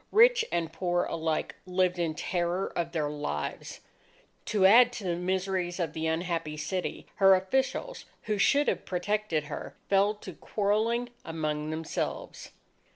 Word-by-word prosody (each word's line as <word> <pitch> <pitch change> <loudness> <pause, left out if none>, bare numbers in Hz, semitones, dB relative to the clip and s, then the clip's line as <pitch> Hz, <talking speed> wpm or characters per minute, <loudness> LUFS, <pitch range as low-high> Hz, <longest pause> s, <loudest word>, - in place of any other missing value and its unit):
Rich 475 +2 +6
and 165 -2 -1
poor 175 +1 0
alike 160 -1 -2
lived 180 -1 +1
in 165 -2 0
terror 175 +2 -1
of 170 -1 -1
their 155 -3 -1
lives. 145 - -4 0.6
To 200 -3 +2
add 240 +5 +8
to 220 - -6
the 175 -2 0
miseries 185 0 -1
of 165 -4 -1
the 160 0 -2
unhappy 165 -2 -2
city, 180 +4 -3
her 195 -1 +7
officials, 265 - -1 0.2
who 210 -2 -1
should 285 +7 +4
have - - 0
protected 185 -3 -1
her, 150 - -7
fell 200 +2 +3
to 210 - -9
quarrelling 220 +4 0
among 155 -2 -3
themselves. 160 0 -4
180 Hz, 145 wpm, -29 LUFS, 165-205 Hz, 0.6 s, add